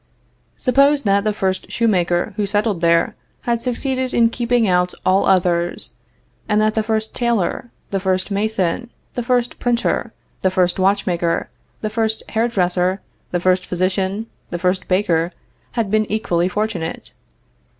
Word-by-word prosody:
Suppose 280 +2 +3
that 200 -1 +3
the 215 - +1
first 190 -2 -2
shoemaker 180 -7 +1
who 205 -2 -1
settled 205 -3 0
there 170 0 +3 0.3
had 235 -1 -1
succeeded 255 +1 -1
in 230 -1 +4
keeping 240 -1 +1
out 180 -1 +2
all 190 +1 +3
others, 175 -2 +1 0.6
and 210 0 +3
that 215 0 +2
the 220 - +1
first 220 0 -1
tailor, 235 -1 0 0.2
the 195 - 0
first 185 +1 0
mason, 205 +1 0 0.2
the 245 - -2
first 245 0 0
printer, 240 -1 0 0.3
the 190 - +3
first 185 -1 +1
watchmaker, 185 -3 +1 0.3
the 215 - -1
first 220 0 0
hair 225 +1 +1
dresser, 185 -3 +1 0.3
the 175 - -1
first 185 +1 +2
physician, 190 +3 0 0.2
the 175 - -3
first 185 +1 0
baker, 180 -3 +1 0.4
had 225 -5 -1
been 215 -1 +1
equally 180 -5 +1
fortunate. 200 -5 -3
200 Hz, 145 wpm, -20 LUFS, 180-225 Hz, 0.6 s, in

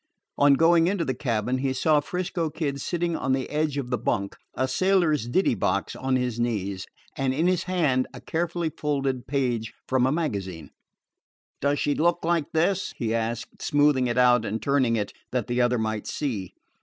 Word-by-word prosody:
On 145 -1 +6
going 165 +2 +4
into 185 -3 0
the 130 - 0
cabin, 120 0 -1
he 135 0 0
saw 150 +3 +3
'Frisco 175 +1 -2
Kid 140 -3 -3
sitting 170 +1 -1
on 130 -3 0
the 130 -1 -1
edge 150 -1 0
of 130 -3 -4
the 125 - 0
bunk, 100 -3 -1 0.2
a 130 - 0
sailor's 160 - +2
ditty 185 +8 +2
box 100 -1 -1
on 130 0 0
his 125 -2 -1
knees, 100 -5 -2 0.3
and 135 -1 0
in 160 +4 +1
his 180 0 +1
hand 150 -9 +1
a - - -10
carefully 170 0 -2
folded 135 -5 -2
page 125 -5 -1 0.2
from 130 -1 +2
a - - +1
magazine. 95 - -3 0.9
"Does 140 +1 +2
she 145 - +1
look 170 +3 +1
like 165 -3 0
this?" 175 +4 0
he 115 -2 -1
asked, 115 0 -3
smoothing 145 -4 +3
it 120 0 -1
out 125 -2 +5
and 110 0 -2
turning 130 0 +2
it 105 -2 -2 0.2
that 125 -4 -1
the 120 +1 0
other 120 0 +2
might 110 -1 -2
see. 110 - -3
135 Hz, 185 wpm, -25 LUFS, 120-160 Hz, 0.9 s, On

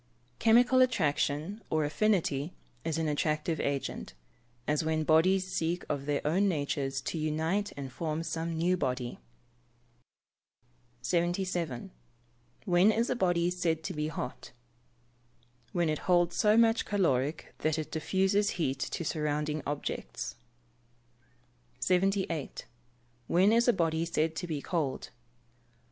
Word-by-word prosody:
_ - - -38
Chemical 245 +3 +5
attraction, 165 - +1
or 155 -1 +1
affinity, 160 -3 +1 0.3
is 165 -1 -1
an 160 -1 0
attractive 155 +1 0
agent 140 - -3 0.5
as 150 +1 +1
when 155 0 0
bodies 185 +5 +4
seek 175 -1 -2
of 140 -1 -2
their 145 -1 -1
own 185 +7 +3
natures 140 -5 -1
to 160 - -3
unite 160 +7 0
and 135 -2 -5
form 160 -1 -2
some 165 0 -3
new 175 +3 +2
body. 125 -7 -2 1.8
77. 175 -4 -1 0.7
When 180 +2 +5
is 230 +2 0
a - - +1
body 175 -5 +2
said 165 -3 -1
to - - -4
be 150 0 -2
hot? 130 -5 -6 1.2
When 175 -1 +1
it 155 -1 0
holds 175 -1 +4
so 215 0 +4
much 230 0 +4
caloric 155 -8 0
that 155 0 0
it 155 - -4
diffuses 190 +5 +1
heat 135 -6 -1
to 170 - -3
surrounding 150 -1 -1
objects. 145 0 -4 1.5
78. 185 -4 0 0.6
_When 190 +5 +4
is 235 +1 +4
a - - +7
body 165 -4 0
said 160 -1 0
to 175 - -3
be 150 -4 -3
cold? 155 -7 -2
165 Hz, 125 wpm, -30 LUFS, 150-185 Hz, 1.8 s, a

